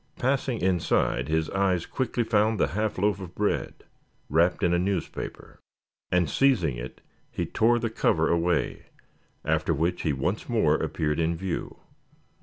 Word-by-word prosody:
Passing 130 -2 0
inside 85 -8 +1
his 80 0 0
eyes 95 -3 +1
quickly 125 -2 -1
found 110 -1 +2
the - - +2
half 105 +6 -2
loaf 100 +1 +1
of 90 -2 -9
bread 105 0 -2 0.5
wrapped 85 +4 +2
in 85 - +3
a 85 - +3
newspaper. 95 -1 -4 0.5
And 90 -2 +3
seizing 90 - +2
it - - -8 0.3
he - - -3
tore 120 +2 +2
the 115 -1 -2
cover 80 -6 +2
away, 85 0 0 0.6
after 80 +1 +1
which 85 +4 0
he 80 - 0
once 65 -1 -2
more - - +3
appeared 75 0 -1
in 85 +1 +1
view. 90 +1 -4
90 Hz, 150 wpm, -26 LUFS, 80-105 Hz, 0.6 s, in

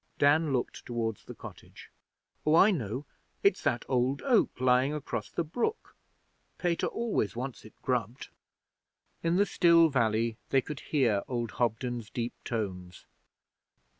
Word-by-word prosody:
Dan 145 +2 +4
looked 125 -2 -2
towards 115 -3 -3
the - - -9
cottage. - - -12 0.5
'Oh, 155 - +4
I 195 +5 +7
know. 125 - -3 0.4
It's 400 - +3
that 120 - 0
old 130 +2 +1
oak 245 - +2
lying 130 +3 +3
across 150 - -4
the 170 - -2
brook. 240 - -3 0.6
Pater 175 -2 0
always 230 - -1
wants 125 -2 -5
it 110 - -15
grubbed.' 125 -2 -2 0.9
In 165 +1 +1
the 200 +2 +4
still 170 -4 +5
valley 115 -3 +1
they 135 - +4
could 150 +2 -7
hear 120 -9 +1
old 120 -2 -2
Hobden's 120 -1 -2
deep 120 0 -3
tones. 90 -6 -4
130 Hz, 135 wpm, -30 LUFS, 115-160 Hz, 0.9 s, I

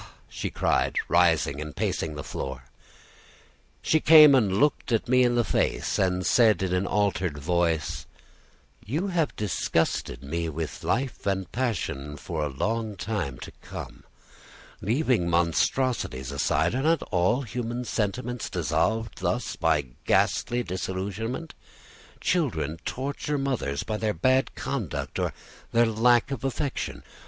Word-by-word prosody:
she - - -4
cried, - - +1
rising 70 +1 +3
and 75 -1 -7
pacing 80 -2 -2
the 75 - -5
floor. 65 -1 -5 1.2
She 155 - +3
came 155 -2 +9
and 105 -8 +3
looked 145 -3 +1 0.2
me 125 +1 +4
in 120 -1 +3
the 120 - +3
face, - - 0
and 90 -1 +1
said 110 -6 +4
in 90 -1 -1
an 90 +1 +1
altered 95 -6 0
voice: 80 -1 0 0.8
"You 160 - -2
have 165 -5 0
disgusted 85 - -1
me 80 +4 -2
with 80 0 -5
life 130 -3 -1
and 95 -3 -1
passion 85 - -2
for 80 +2 -4
a 75 - -1
long 110 +9 -2
time 95 - -3
to - - -7
come. - - -8 0.8
Leaving 115 - +1
monstrosities 85 - 0
aside, 70 +4 +1
are 130 - 0
not 160 +3 +2
all 95 +8 +2
human 120 +1 -4
sentiments 120 +3 -2
dissolved 90 +7 -1
thus, 100 +3 -1
by 80 -4 +1 0.2
ghastly 120 0 +2
disillusionment? 100 - -4 0.7
Children 85 - 0
torture 140 +2 -2
mothers 130 - -1
by 110 - -3
their 105 -2 -1
bad 130 +10 +2
conduct, 120 - -3
or - - 0 0.4
their 120 +1 +5
lack 115 +3 +3
of 135 -3 -4
affection. 135 +1 -3
105 Hz, 130 wpm, -26 LUFS, 85-125 Hz, 1.2 s, came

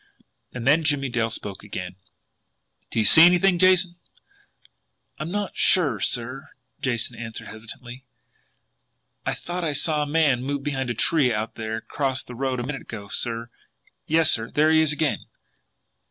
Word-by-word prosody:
And 125 -2 -7
then 155 +4 +4
Jimmie 145 -3 +1
Dale 120 -2 0
spoke 100 -3 -5
again: 90 -3 -7 0.9
"Do - - -5
you 110 - +3
see 160 - +9
anything, 180 +1 +5
Jason?" 185 -1 +3 1.2
"I'm 155 +3 -4
not 205 +1 -3
sure, 145 - +3
sir," 125 +5 -2 0.3
Jason 125 -3 -2
answered 115 -1 -8
hesitantly. 120 +3 -9 1.2
"I - - 0
thought 175 +1 -5
I 155 -3 -1
saw 150 +2 +1
a 150 - -2
man 145 -5 +2
move 140 +1 -3
behind 135 -3 -3
a 120 - -2
tree 140 +1 +2
out 110 +2 -3
there 110 0 -4
across 130 +2 -3
the 125 - -11
road 130 0 -2
a - - -3
minute 135 +1 -5
ago, 100 -3 -9
sir. 115 0 -2 0.6
Yes, 160 0 +3
sir 115 0 +1
there 155 +1 +2
he 160 0 +5
is 155 -2 +2
again!" 150 -1 -1
135 Hz, 160 wpm, -24 LUFS, 115-155 Hz, 1.2 s, see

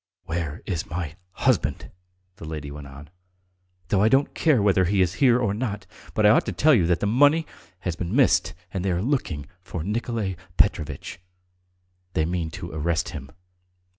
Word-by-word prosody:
"Where 80 0 -4
is 85 -5 -3
my 80 -2 -4 0.2
husband?" - - 0 0.5
the 100 - -9
lady 75 -2 -6
went 70 -1 -8
on. 70 +3 -12 0.8
"Though 100 - +3
I 110 - +5
don't 135 +4 +3
care 155 -7 +3
whether 95 -2 +3
he 95 +3 +1
is 90 -1 +3
here 125 -3 +6
or 105 -5 +1
not, 105 -3 -3 0.3
but 105 - +3
I 105 - +8
ought - - +3
to - - 0
tell 155 +1 +4
you 95 -10 +4
that 85 -1 +1
the - - +1
money 145 +9 +4 0.4
has 90 -4 -2
been 90 +5 -3
missed, 135 - +3 0.2
and 95 - -2
they 95 -2 +1
are 85 - -1
looking 100 - -1 0.2
for 90 -2 -5
Nikolay 105 -2 -2 0.2
Petrovitch.... 75 -9 0 0.9
They 80 -3 +1
mean 85 -1 -2
to - - -7
arrest 80 +1 -1
him. 70 - -8
95 Hz, 180 wpm, -25 LUFS, 80-110 Hz, 0.9 s, I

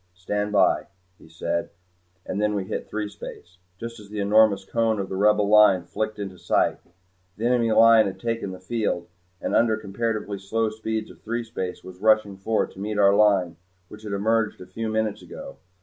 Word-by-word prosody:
"Stand 105 +3 -2
by," 100 - +3 0.3
he - - -17
said, 85 +1 -3 0.6
and 100 - -3
then 105 0 +1
we 100 - -1
hit 95 - -5
threespace, 105 -4 -7 0.2
just 115 +2 -7
as 105 -1 -13
the 105 0 -5
enormous 100 -1 +4
cone 110 +1 +1
of 95 - -3
the 95 - -4
Rebel 105 +1 +3
Line 105 -3 +6
flicked 110 +5 -3
into 95 -3 -6
sight. - - +1 0.6
The 110 - -3
enemy 120 -2 +2
line 115 -1 +6
had 95 - -6
taken 115 -3 -2
the 95 -1 -8
field, 95 -3 -2 0.3
and - - -2
under 115 -1 +4
the 110 - -9
comparatively 105 0 -3
slow 110 +3 -1
speeds 110 0 -4
of - - -18
threespace 115 -5 -4
was 90 -1 -11
rushing 110 -1 +3
forward 110 +3 -1
to - - -14
meet 105 +1 -3
our 100 -1 +5
Line 100 -5 +3 0.3
which 105 - -12
had 105 -2 -6
emerged 110 +2 0
a 90 - -9
few 110 +5 -4
minutes 110 -1 -1
ago. - - -10
105 Hz, 190 wpm, -24 LUFS, 95-110 Hz, 0.6 s, Line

